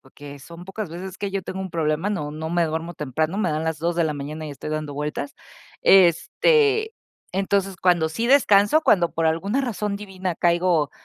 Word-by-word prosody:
que 145 -1 -10
son 170 +5 -11
pocas 195 +1 -6
veces 185 +3 -8
que 200 -1 -4
yo 195 - -2
tengo 190 +1 -6
un 190 0 -4
problema, 165 +2 -1
no 150 -8 -3
no 160 +1 -5
me 175 0 +1
duermo 160 +2 -4
temprano, 155 +6 -2
me 185 -6 0
dan 155 +1 -2
las 160 -1 -1
2 170 +1 0
de 170 - +3
la 150 - -1
mañana 150 +2 -6
y 150 - -6
estoy 140 +2 -7
dando 155 -2 -4
vueltas, 145 0 -4 0.5
este, 430 - +4 0.4
entonces 195 0 0
cuando 175 -2 +2
sí 225 +9 -3
descanso, 235 -1 +5
cuando 175 - +3
por 165 - -1
alguna 185 +10 0
razón 210 -6 -2
divina 190 -3 -4
caigo 170 -3 +2
175 Hz, 195 wpm, -23 LUFS, 155-195 Hz, 0.5 s, descanso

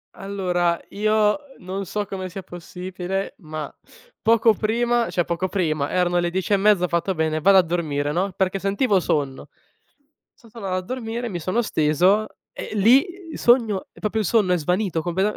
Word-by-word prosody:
Allora, 180 -3 -1
io 215 +3 +2 0.2
non 190 +2 -5
so 210 -1 -2
come 190 -2 -5
sia 190 +2 -8
possibile, 180 +2 -5
ma, 155 -3 -6 0.5
poco 225 0 +4
prima 235 +2 0
cioè, 175 - 0
poco 175 +2 -1
prima, 155 -7 -1
erano 175 -1 +1
le 175 - 0
10 190 +3 -1
e 200 - +5
mezza, 200 -2 +3
ho - - +2
fatto: 170 +3 -1
"Bene, 155 -1 0
vado 195 +4 +6
a 185 - +6
dormire, 150 -4 -1
no," 185 +4 -1
perché 190 +1 -1
sentivo 200 +1 +1
sonno. 140 -5 -2 0.8
So 230 - -21
tornato 200 -5 -5
a - - 0
dormire, 235 +3 -4
mi 175 -5 -5
sono 185 +8 0
steso 185 +3 +2 0.3
e - - -7
lì 235 - +5 0.3
sogno 230 -5 +2
e - - -19
proprio 220 +1 -1
il 210 - -1
sonno 205 -2 +2
è 180 - +4
svanito 180 +1 -1
completame 190 +5 0
190 Hz, 175 wpm, -23 LUFS, 175-210 Hz, 0.8 s, vado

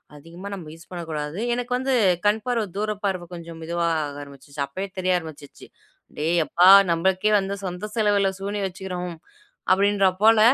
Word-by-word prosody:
"அதிகமாக 170 +7 -10
நம்ம 180 -5 -7
யூஸ் 165 0 -15
பண்ணக்கூடாது," 160 -1 -5
எனக்கு 245 0 -4
வந்து 260 +1 -1 0.3
கண்பார்வை 220 +3 +1
தூரப்பார்வ 205 -3 -2
கொஞ்சம் 170 -1 -9
மெதுவா 170 +1 -1 0.2
ஆக 145 0 -7
ஆரம்பிச்சுருச்சு. 140 +1 -7
அப்பவே 190 +8 -5
தெரிய 185 0 +1
ஆரம்பிச்சுருச்சு. 155 -4 -12 0.5
"டேய் 165 +3 +1
யப்பா! 175 +3 +4 0.2
நம்மளுக்கே 185 +5 +1
வந்து 195 +1 -3
சொந்த 180 +4 -5
செலவுல 205 -3 +2
சூனியம் 200 0 -2
வச்சுக்கிறோம்." 180 -2 -6 0.6
அப்பிடின்றாப் 195 -1 +3
போல, 225 0 +6
185 Hz, 140 wpm, -24 LUFS, 165-205 Hz, 0.6 s, போல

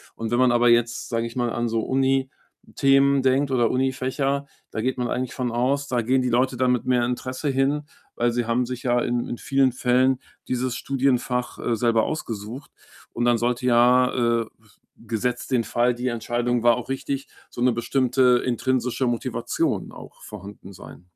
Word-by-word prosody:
Und 115 -1 -4
wenn 120 +2 +1
man 130 -1 +4
aber 120 0 +4
jetzt, 120 0 +1
sage 115 -1 -1
ich 115 - -7
mal, 120 -1 0
an 120 0 -1
so 115 0 0
Unithemen 135 +1 +1
denkt 135 +2 +2
oder 120 -3 +2
Unifächer, 135 +2 -1 0.3
da 110 - -3
geht 130 +3 -1
man 125 -1 -1
eigentlich 125 +1 -3
von 125 -2 -2
aus, 135 +4 0
da 125 -3 0
gehen 130 +3 +1
die 125 - 0
Leute 125 +2 +1
dann 125 0 +2
mit 125 - -1
mehr 125 -2 +2
Interesse 130 +3 -4
hin, 140 +2 0 0.3
weil 120 0 +1
sie 120 0 -1
haben 120 +2 +1
sich 125 0 -6
ja 120 -1 +2
in 120 0 -1
in 120 - -5
vielen 135 0 +2
Fällen 125 +1 +2 0.3
dieses 125 -1 -1
Studienfach, 125 -2 -1
äh, 120 - -1
selber 115 0 +2
ausgesucht. 120 -3 -5 0.4
Und 120 - -2
dann 120 -1 +3
sollte 120 +2 -1
ja, 120 -1 +3
äh, - - -12
b 110 -1 -27 0.4
gesetzt 115 +4 -2
den 120 -3 +2
Fall, 120 +1 +1
die 125 +1 -2
Entscheidung 120 +1 -1
war 120 0 +5
auch 125 +1 -7
richtig, 135 +1 -3 0.2
so - - -8
'ne 125 0 +4
bestimmte 125 +1 +2
intrinsische 125 +1 0
Motivation 120 -2 -2
auch - - -13
vorhanden 100 -1 -11
sein. 90 -1 -13
125 Hz, 185 wpm, -23 LUFS, 120-130 Hz, 0.4 s, war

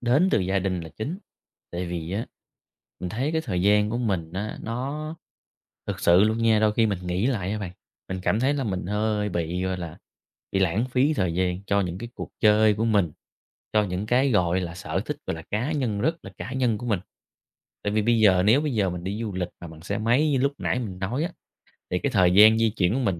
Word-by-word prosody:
đến 135 +10 +3
từ - - +3
gia 95 +1 +1
đình 95 -2 -1
là 80 - -8
chính, 150 - -4 0.5
tại 90 +1 -3
vì 85 0 -4
á, 110 +4 -2 0.7
mình 90 - -3
thấy 130 - -2
cái 160 - +1
thời 90 - -2
gian 105 +1 +4
của 120 - -1
mình 95 -8 -1
á 100 +3 -4
nó 140 +7 -4 0.7
thực - - -4
sự 85 +2 +5
luôn 110 +1 +1
nha, 115 -2 +3
đôi 110 -1 +3
khi 115 +1 +3
mình 100 -4 -1
nghĩ 90 +6 0
lại 100 -8 -1
nha 105 - -2
bạn, 95 -4 -5 0.4
mình 95 0 -4
cảm 105 +4 +1
thấy 140 +3 +2
là 140 - -1
mình 95 -5 -3
hơi 105 +1 0
bị, 85 0 -2
gọi 95 0 -1
là, 85 -3 -7 0.5
bị 95 - +1
lãng 95 +5 +2
phí 140 +4 +3
thời 90 - 0
gian 90 +1 -1
cho 100 0 +2
những 90 -1 -3
cái 120 - -6
cuộc - - -7
chơi 105 -1 +5
của 110 +2 -1
mình, 100 -8 +2 0.6
cho 105 -1 +3
những 95 +2 -3
cái, 130 +4 +3
gọi 90 -3 +2
là, 85 -2 -4
sở 90 - -3
thích, - - -3
gọi - - -1
là, 80 - -8
cá 120 +9 -1
nhân 120 -9 -1
rất 160 +8 +1
là - - -8
cá 125 - -6
nhân 125 -5 +1
của 120 - -6
mình. 105 -6 +1 0.8
Tại 105 - 0
vì 110 0 +2
bây 115 0 +3
giờ 95 -4 +5
nếu 110 +9 +5
bây 150 -5 -2
giờ 100 -4 +1
mình 90 0 -6
đi 100 +4 -3
du 110 -3 -3
lịch 90 -1 -2
mà 85 - -8
bằng 80 0 -12
xe 100 +4 -3
máy 125 +8 +2
như 135 - +2
lúc 140 +2 +2
nãy - - 0
mình 95 -6 -5
nói 120 - -1
á, 175 - -2 0.6
thì 90 - +1
cái 140 - -1
thời 95 -6 +4
gian 110 +3 +8
di 115 -1 +3
chuyển 90 +2 +2
của 135 - 0
mình 95 -9 0
105 Hz, 250 wpm, -25 LUFS, 90-120 Hz, 0.8 s, gian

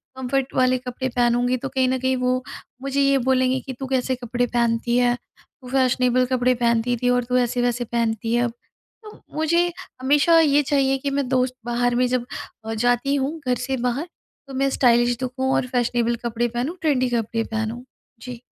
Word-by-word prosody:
Comfort 260 +1 -2
वाले 255 0 +3
कपड़े 250 +1 -4
पहनूँगी, 245 +1 +1
तो 270 +2 -5
कहीं 260 -1 +1
न 260 - +1
कहीं 260 +1 +1
वो 250 0 0 0.4
मुझे 275 +1 -1
ये 275 0 +4
बोलेंगे 260 0 +2
कि 265 - -7
तू 270 - -4
कैसे 260 0 0
कपड़े 245 0 -2
पहनती 235 0 +1
है? 245 -1 +3 0.5
तू 255 - -11
फैशनेबल 255 -1 +2
कपड़े 255 0 +2
पहनती 235 0 +1
थी 245 - +3
और 245 0 +2
तू 250 +1 0
ऐसे-वैसे 245 0 0
पहनती 225 -1 -1
है 240 - +2
अब। 235 -1 -2 0.5
तो 425 -1 -13 0.2
मुझे 340 +3 +2 0.3
हमेशा 295 +5 +4
ये 295 -2 +4
चाहिए 270 -1 +1
कि 280 +1 -3
मैं 275 -1 -1
दोस्त 255 -1 +1
बाहर 240 0 0
में 250 +1 +3
जब 250 -1 -1 0.4
अ, 225 - -3
जाती 245 +4 +1
हूँ 285 +4 -2
घर 250 - +2
से 260 +2 -3
बाहर 270 +8 -2 0.4
तो 270 - -10
मैं 275 +1 +1
स्टाइलिश 240 -2 +3
दिखूँ 260 +1 -1
और 255 - 0
फैशनेबल 240 -1 0
कपड़े 235 +1 0
पहनूँ 245 +9 -3
ट्रेंडी 265 -5 +1
कपड़े 230 -1 -1
पहनूँ। 225 +2 -4 0.4
जी। 245 -1 -8
250 Hz, 190 wpm, -22 LUFS, 240-265 Hz, 0.5 s, ये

